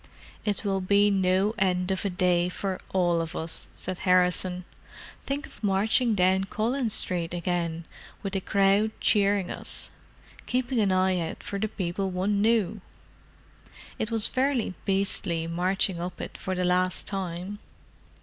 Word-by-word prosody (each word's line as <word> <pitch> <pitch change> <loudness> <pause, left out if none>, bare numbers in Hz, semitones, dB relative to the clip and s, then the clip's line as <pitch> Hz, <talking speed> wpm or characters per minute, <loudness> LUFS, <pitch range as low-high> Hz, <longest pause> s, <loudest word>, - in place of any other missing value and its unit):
"It 210 0 -1
will 195 -1 0
be 200 +2 +4
no 190 +2 +2
end 180 -1 +1
of 190 - -1
a 200 - 0
day 180 -1 +2
for 190 0 -3
all 175 -3 +2
of 165 +1 -5
us," 160 0 0
said 185 -1 -3
Harrison. 180 -1 +2 0.6
"Think 285 +2 -2
of - - -15
marching 215 +4 +2
down 190 0 +3
Collins 230 +3 0
Street 175 -2 0
again, 170 -1 -2 0.4
with 195 - -4
the 195 - 0
crowd 200 +2 +3
cheering 200 -3 +2
us—keeping 255 0 -5
an 200 -3 +3
eye 185 0 +2
out 165 -1 -5
for 200 -1 -4
the 220 - 0
people 190 -1 -3
one 195 +3 0
knew! 215 -2 +2 1.2
It 220 - -1
was 225 -2 +2
fairly 260 -6 +1
beastly 190 -4 0
marching 180 +1 0
up 175 0 -5
it - - -6
for 185 - -3
the 180 0 0
last 180 0 +1
time." 190 +1 -4
190 Hz, 150 wpm, -27 LUFS, 180-205 Hz, 1.2 s, be